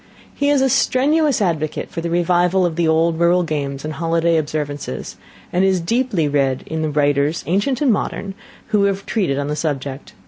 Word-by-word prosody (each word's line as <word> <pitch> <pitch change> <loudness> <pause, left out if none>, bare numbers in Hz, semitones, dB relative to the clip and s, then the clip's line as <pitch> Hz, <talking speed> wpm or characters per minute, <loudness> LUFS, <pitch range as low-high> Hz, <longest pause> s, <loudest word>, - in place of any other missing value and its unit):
He 285 0 0
is 285 -2 +3
a - - +4
strenuous 280 0 +2
advocate 155 -4 -2
for 165 - -4
the 170 - -3
revival 175 +2 +2
of 170 -2 -1
the 170 -1 +1
old 160 +1 +2
rural 175 +1 +3
games 140 -3 -3
and 155 - -4
holiday 165 +2 +1
observances, 145 - -3 0.4
and 180 +2 +2
is 190 -1 +2
deeply 200 - 0
read 140 -2 0
in 160 0 -4
the 155 - -1
writers, 145 +1 +1
ancient 205 - 0
and 270 -6 +4
modern, 200 -1 -3 0.4
who 205 -2 +3
have 200 0 -1
treated 180 -12 0
on 145 0 -2
the 150 - -2
subject. 140 -3 -4
165 Hz, 185 wpm, -19 LUFS, 150-195 Hz, 0.4 s, a